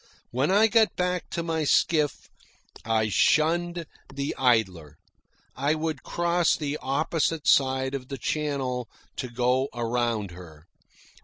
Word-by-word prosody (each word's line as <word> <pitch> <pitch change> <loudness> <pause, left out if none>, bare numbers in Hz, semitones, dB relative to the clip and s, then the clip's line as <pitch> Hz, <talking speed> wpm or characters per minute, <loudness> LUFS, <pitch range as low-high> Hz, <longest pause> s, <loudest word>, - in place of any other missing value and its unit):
When 130 +5 0
I 205 +3 +5
got 225 -1 +3
back 180 0 -1
to 170 - -3
my 165 -1 -1
skiff, 150 0 +1 0.6
I 110 -1 +1
shunned 170 - +2 0.3
the 140 +1 -3
Idler. 95 - +1 0.6
I 140 +4 +1
would 155 -2 -3
cross 175 0 +1
the 150 -1 -3
opposite 155 +3 -1
side 130 0 +3
of 130 -2 -5
the 135 - -6
channel 130 -3 -2 0.3
to 125 - -4
go 125 +3 +1
around 115 -4 -1
her. 85 -3 -13
140 Hz, 130 wpm, -26 LUFS, 120-160 Hz, 0.6 s, I